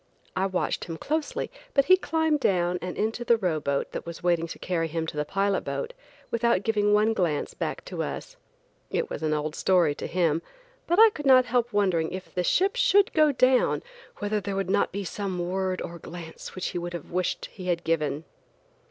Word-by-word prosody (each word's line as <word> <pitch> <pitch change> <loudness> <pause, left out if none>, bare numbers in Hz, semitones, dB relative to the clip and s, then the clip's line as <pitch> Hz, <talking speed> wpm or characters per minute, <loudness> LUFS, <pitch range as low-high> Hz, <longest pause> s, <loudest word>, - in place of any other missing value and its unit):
I 190 +1 +1
watched 185 -2 -1
him 165 -2 -6
closely, 310 - -2 0.2
but 275 -1 +5
he 370 - +7
climbed 320 -4 0
down 180 -6 +1
and 180 0 -5
into 225 +3 -1
the 235 -1 +4
row 180 -7 0
boat, 140 -1 -1
that - - -5
was 170 0 -8
waiting 170 -1 +2
to - - -8
carry 170 -3 -1
him 160 0 -2
to 160 - -6
the 150 0 -1
pilot 195 +4 0
boat, 485 0 -4 0.4
without 235 -4 +2
giving 210 -1 +2
one 210 +2 +4
glance 170 -8 -1
back - - -4
to - - -4
us. - - -5 0.5
It 470 - -2
was - - -4
an 155 -1 0
old 150 0 -1
story 175 -4 +3
to - - -6
him, 165 -3 +1 0.5
but 345 - +2
I 445 0 +8
could 295 -7 -5
not 255 -1 +7
help 245 0 0
wondering 185 -6 +1
if 185 0 -7
the 180 - 0
ship 385 - +2
should - - +4
go 310 -2 +5
down, 255 -1 +3 0.3
whether 205 0 -1
there 200 0 -3
would 195 -1 -1
not - - +2
be 200 +2 -3
some 195 0 -4
word 185 +1 -1
or 170 0 -7
glance 165 -1 -9
he 180 -1 -4
would 175 -2 -6
wish 180 0 0
he 185 -2 -8
had 175 -1 0
given. 155 -2 0
190 Hz, 205 wpm, -26 LUFS, 170-240 Hz, 0.5 s, I